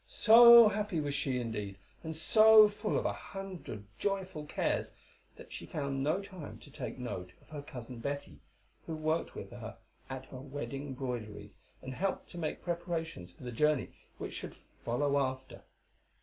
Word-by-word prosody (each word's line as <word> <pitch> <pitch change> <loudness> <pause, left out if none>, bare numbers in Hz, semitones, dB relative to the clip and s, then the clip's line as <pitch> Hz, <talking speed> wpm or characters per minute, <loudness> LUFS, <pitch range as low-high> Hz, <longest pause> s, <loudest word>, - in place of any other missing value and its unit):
So 235 0 +9
happy 210 -4 -1
was 145 -1 -2
she 140 -2 0
indeed, 105 -4 -4 0.3
and 160 -1 -5
so 215 +6 +7
full 210 +1 -2
of - - -1
a - - +1
hundred 190 - -7 0.2
joyful 190 -6 -2
cares, - - -1 0.4
that - - -13
she - - -7
found 140 -2 -3
no 155 +8 +1
time 185 -6 -9
to 145 - -14
take 135 -2 -6
note 90 -8 -6
of - - -25
her 150 -2 -6
cousin 125 -4 -9
Betty, 130 - -5 0.5
who 160 - -3
worked 155 +1 -1
with - - -7
her - - -8 0.3
at 130 0 -6
her 130 - -7
wedding 135 0 -5
broideries, 110 -6 -6 0.3
and 130 0 -5
helped 195 +8 -2
to 175 - -7
make 155 -2 -3
preparations 165 - -3
for 90 - -16
the 125 - -5
journey 145 -3 +2 0.3
which - - -6
should - - -6
follow 140 +4 -1
after. 130 -1 -3
145 Hz, 165 wpm, -32 LUFS, 125-175 Hz, 0.5 s, So